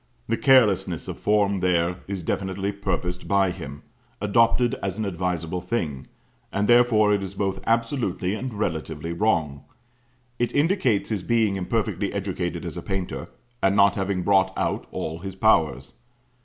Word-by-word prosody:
The 115 - +1
carelessness 100 - +3
of - - -6
form 100 -2 +2
there 90 -1 +1
is 95 -3 -4
definitely 95 +3 -2
purposed 90 -3 -3
by 100 -2 +3
him; 75 -5 -8 0.4
adopted 115 +4 +3
as 95 0 -3
an 110 - -2
advisable 90 -2 -2
thing; 80 - -3 0.4
and 100 +1 0
therefore 120 -3 +5
it 100 - +1
is 95 0 -6
both 95 -1 -1
absolutely 115 -5 0
and 125 +4 -4
relatively 80 -5 -3
wrong; 80 -8 0 0.8
it 120 -1 +1
indicates 145 - +2
his 105 -4 -1
being 110 -1 +1
imperfectly 100 0 -1
educated 95 -3 -3
as - - -6
a - - -4
painter, 95 -2 -4 0.3
and 95 0 +3
not 100 -1 +5
having 95 -2 -1
brought 95 -1 +3
out - - -1
all 80 +1 -4
his 95 +1 -7
powers. 80 - +2
95 Hz, 150 wpm, -24 LUFS, 90-110 Hz, 0.8 s, therefore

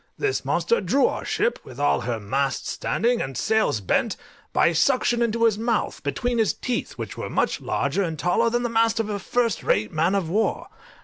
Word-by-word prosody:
This 415 -1 -1
monster 470 - +1
drew 275 - +2
our - - -1
ship, 480 - 0
with 130 +1 -11
all 145 -3 +2
her 115 -1 -2
masts 135 +7 -1
standing, 240 +1 0
and 135 -1 -4
sails 215 - +1
bent, 95 - 0 0.3
by 170 - +3
suction 240 - +2
into 230 0 +1
his 220 -2 +3
mouth, 230 -1 -1
between 235 - -1
his 220 - +2
teeth, 250 -2 -3
which - - -7
were - - -4
much - - 0
larger 200 - -1
and 165 -4 -2
taller 180 +9 +2
than 240 +1 0
the - - +1
mast 225 -1 +2
of 220 -1 -1
a 205 -1 -2
first 230 +2 0
rate 105 - +1
man 165 +5 +2
of 190 -4 0
war. 210 +7 -1
220 Hz, 200 wpm, -24 LUFS, 155-235 Hz, 0.3 s, by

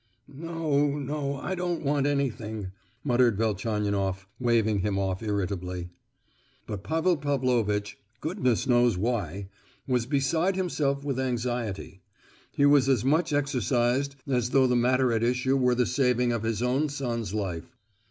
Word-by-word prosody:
"No, 150 -2 0
no; 140 0 -3
I 160 +7 -4
don't 175 -2 -2
want 140 0 +1
anything," 110 -8 -2 0.3
muttered 120 -5 +3
Velchaninoff, 100 -3 -1
waving 115 -4 +2
him 100 +1 -1
off 95 -1 -1
irritably. 90 -4 -3 0.8
But 100 -2 -6
Pavel 165 - +1
Pavlovitch—goodness 125 - -1
knows 120 -4 +3
why—was 100 - -3
beside 160 +7 +1
himself 145 -7 -1
with 135 -3 -1
anxiety; 120 -6 -3 0.5
he 140 - +2
was 145 -2 +5
as 130 -3 +2
much 155 +4 +2
exercised 135 -1 +1
as 125 -3 0
though 135 0 +4
the 125 -1 +2
matter 125 +1 +3
at 110 - +1
issue 125 +3 +1
were 125 -2 +3
the 125 0 +2
saving 125 -2 +2
of 115 -2 -1
his 115 0 -1
own 135 +5 +1
son's 120 -7 -3
life. 95 +3 -4
125 Hz, 135 wpm, -27 LUFS, 105-140 Hz, 0.8 s, was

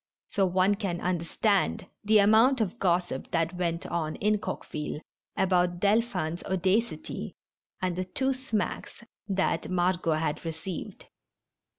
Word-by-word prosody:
So 195 -2 +2
one 185 +2 +3
can 195 -4 -2
understand 185 +4 0 0.2
the 215 +1 +5
amount 220 +6 +5
of 220 +1 -1
gossip 175 -6 0
that 165 +1 0
went 170 -2 -2
on 160 -2 -2
in 210 0 +1
Coqueville 150 -6 -4 0.4
about 180 -2 +2
Dolphin's 200 -5 +1
audacity, 190 +5 -1 0.5
and 180 -2 0
the 185 +1 -2
two 265 +9 0
smacks 235 -4 -3 0.2
that 195 -2 0
Margot 175 -2 +1
had 155 -1 -1
received. 165 +2 -6
185 Hz, 120 wpm, -28 LUFS, 170-210 Hz, 0.5 s, the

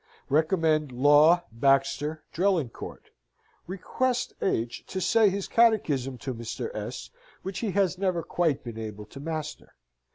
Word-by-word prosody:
Recommend 155 -1 +2
Law, 145 +7 +5
Baxter, 135 +5 +1
Drelincourt. 175 -8 -2 0.6
Request 245 +7 -1
H. 115 -10 -1
to 190 - -4
say 210 +4 +4
his 195 0 -3
catechism 160 - +2
to 130 - -2
Mr. 115 - -5
S., - - -6 0.3
which 190 -1 -4
he 225 - -2
has 190 -2 +1
never 185 -4 0
quite 165 -3 0
been 115 -2 -7
able 105 -1 -6
to 135 - -12
master. 155 0 -6
160 Hz, 130 wpm, -27 LUFS, 135-190 Hz, 0.6 s, Law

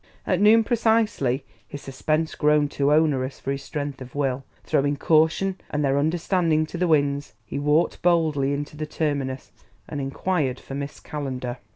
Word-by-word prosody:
At 185 0 +1
noon 220 +2 +6
precisely, 220 - +1 0.2
his 145 - -8
suspense 155 +4 -1
grown 150 -1 +3
too 140 0 +1
onerous 145 -4 +2
for 135 - -3
his 140 0 -3
strength 145 -1 -5
of 125 0 -10
will, 135 -2 -1 0.2
throwing 145 +1 +1
caution 165 +6 +2
and 150 0 0
their 135 +1 +2
understanding 160 0 +1
to 165 - -7
the 180 - +2
winds, 145 -2 +1
he - - -4
walked 150 +3 +1
boldly 160 -6 +2
into 145 +1 -4
the 155 0 -4
Terminus, 140 -4 -2 0.4
and 145 -2 -4
inquired 135 -1 -1
for - - -10
Miss 140 +1 -5
Calendar. 130 -4 -5
145 Hz, 165 wpm, -24 LUFS, 140-160 Hz, 0.4 s, noon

